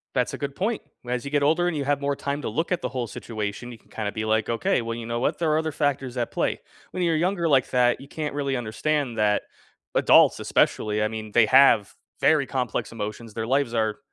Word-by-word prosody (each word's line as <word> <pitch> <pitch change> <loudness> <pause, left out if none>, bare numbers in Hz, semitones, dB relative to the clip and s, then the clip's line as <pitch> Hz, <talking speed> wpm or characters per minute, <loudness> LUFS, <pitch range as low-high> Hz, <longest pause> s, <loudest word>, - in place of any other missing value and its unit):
That's 125 -2 0
a - - -4
good 140 -1 -5
point. 215 +4 -1 0.2
Whe 120 - -6
as 125 0 -1
you 140 - -5
get 145 -1 +2
older 165 +4 +3
and 175 - -1
you 140 - -2
have 145 0 0
more 140 0 0
time 140 +1 -3
to - - -3
look 165 +12 -2
at 180 - 0
the - - -2
whole 125 -2 -3
situation, 110 +2 -5
you 115 - -10
can - - -29
kinda 105 -2 -3
be, 110 +1 -4
like, 110 0 +1
"Okay. 125 +7 +1
Well, 115 0 -4
you 115 -1 -6
know 120 0 -2
what? - - 0
There 160 -2 +1
are 155 - +3
other 160 0 -1
factors 135 -4 -1
at 120 - -2
play." - - -1 0.3
When 185 - -2
you're 165 -1 +2
younger 175 +1 0
like 135 -5 +3
that, 125 0 +2
you 140 - -11
can't 150 0 -4
really 140 -2 -1
understand 125 +3 -1
that 105 -1 +2 0.5
adults, - - +5
especially, 105 0 +1
I - - +2
mean, 110 -1 -6
they 120 -2 +6
have 130 -7 +5 0.2
very 150 -1 +3
complex 125 -1 -2
emotions, 110 0 -6
their 110 0 -4
lives 135 -2 +1
are 110 -2 0
130 Hz, 245 wpm, -25 LUFS, 115-145 Hz, 0.5 s, they